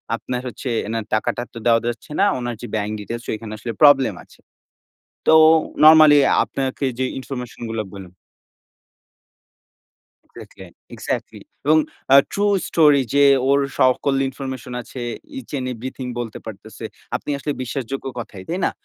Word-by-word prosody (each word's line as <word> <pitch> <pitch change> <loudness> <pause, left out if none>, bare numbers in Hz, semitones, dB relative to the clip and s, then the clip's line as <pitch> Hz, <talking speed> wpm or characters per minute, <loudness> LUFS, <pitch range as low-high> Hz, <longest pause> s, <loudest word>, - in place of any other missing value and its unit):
আপনার 125 -1 -5
হচ্ছে 125 +1 -6 0.2
এনার 115 -1 -3
টাকাটা 110 +2 0
তো - - -10
দেওয়া 115 -1 +4
যাচ্ছে 120 - -5
না। 200 - +5
উনার 120 -1 -4
যে 120 - -6
bank 105 0 -2
details 115 +3 -6
সেখানে 110 0 -5
আসলে 115 +2 -5
প্রবলেম 135 -6 +6
আছে।" - - -22 0.9
তো 160 - +6 0.5
নরমালি 155 -1 +8 0.3
আপনাকে 135 +1 -3
যে 130 - 0
ইনফরমেশনগুলো 120 -4 -5
বললাম 95 -3 -10 2.1
এক্সাক্টলি, - - -13 0.3
এক্সাক্টলি। - - -4 0.3
এবং 155 +1 +5 0.4
আ - - +10 0.2
true 205 0 +1
story 150 -4 +4
যে 140 0 +5 0.2
ওর 140 +1 +4 0.2
সকল 130 +1 +3
ইনফরমেশন 130 -2 -7
আছে, 130 - -10 0.4
each 265 - -11
and 130 - -4
everything 130 +2 -7
বলতে 115 -3 -6
পারতেছে। - - -10 0.3
আপনি - - -7
আসলে 145 +1 -3
বিশ্বাসযোগ্য 135 +1 -5
কথাই, 110 -5 -8
তাই 175 - -2
না? - - +1
130 Hz, 140 wpm, -21 LUFS, 115-140 Hz, 2.1 s, আ